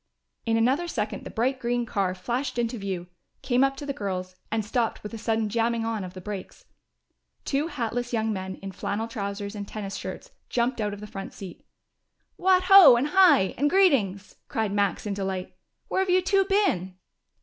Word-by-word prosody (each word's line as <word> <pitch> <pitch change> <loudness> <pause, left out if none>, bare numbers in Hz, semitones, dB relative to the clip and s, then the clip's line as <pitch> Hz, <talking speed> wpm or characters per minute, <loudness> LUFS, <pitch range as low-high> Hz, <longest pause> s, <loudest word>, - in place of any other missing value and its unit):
In 225 0 +3
another 265 +10 +2
second - - -3
the - - -6
bright 255 +3 0
green 240 0 -1
car 195 -4 -1
flashed 245 +8 -3
into 235 0 -1
view, 190 -3 -4 0.4
came 250 0 +3
up 270 0 +1
to 290 - -6
the 280 - -2
girls, 185 -4 -4
and 220 -1 -1
stopped 230 +1 -1
with 210 - -7
a - - -4
sudden 225 -1 0
jamming 230 +1 0
on 225 -3 -2
of 180 0 -8
the - - -6
brakes. 200 0 -7 0.8
Two 285 +3 0
hatless 245 -5 -3
young 220 -2 0
men 190 -1 -5
in 195 - -5
flannel 205 +4 -3
trousers 200 -2 -4
and 205 -1 -6
tennis 200 -2 -6
shirts - - -7 0.2
jumped 240 0 0
out 205 -1 -1
of 205 - -12
the - - -6
front 195 -2 -7
seat. 190 -3 -10 0.7
"What 370 0 +3
ho! 370 -9 +9
and 260 +5 0
hi! 325 - +5
and 290 +2 +3
greetings!" 245 - +2
cried 220 -3 -1
Max 200 -1 0
in 205 - -2
delight. 190 -2 -4 0.3
"Where - - -1
have 380 - -1
you 365 0 +4
two 390 +1 +3
been?" 380 - +1
225 Hz, 195 wpm, -26 LUFS, 200-270 Hz, 0.8 s, ho